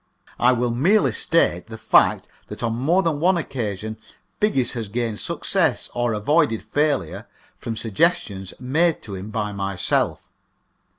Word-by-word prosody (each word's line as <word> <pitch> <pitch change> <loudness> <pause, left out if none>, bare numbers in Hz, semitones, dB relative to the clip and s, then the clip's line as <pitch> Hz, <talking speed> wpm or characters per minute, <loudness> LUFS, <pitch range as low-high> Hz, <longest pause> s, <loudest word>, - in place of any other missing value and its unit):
I 125 - +5
will 125 -1 0
merely 175 - +3
state 100 - +1
the 110 -1 -8
fact 110 0 +3 0.2
that - - -8
on 115 -1 0
more 160 +11 +2
than 160 -4 0
one 180 +3 +3
occasion 110 - -4 0.4
Figgis 135 - +2
has 115 -3 -4
gained 115 0 -2
success 170 -3 0
or 120 -1 0
avoided 115 +2 +1
failure 145 - -1 0.3
from 115 -1 -5
suggestions 100 - 0
made 155 +6 +1
to 105 - -8
him 95 +2 -6
by 105 -1 -2
myself. 100 -2 -1
120 Hz, 140 wpm, -22 LUFS, 105-155 Hz, 0.4 s, I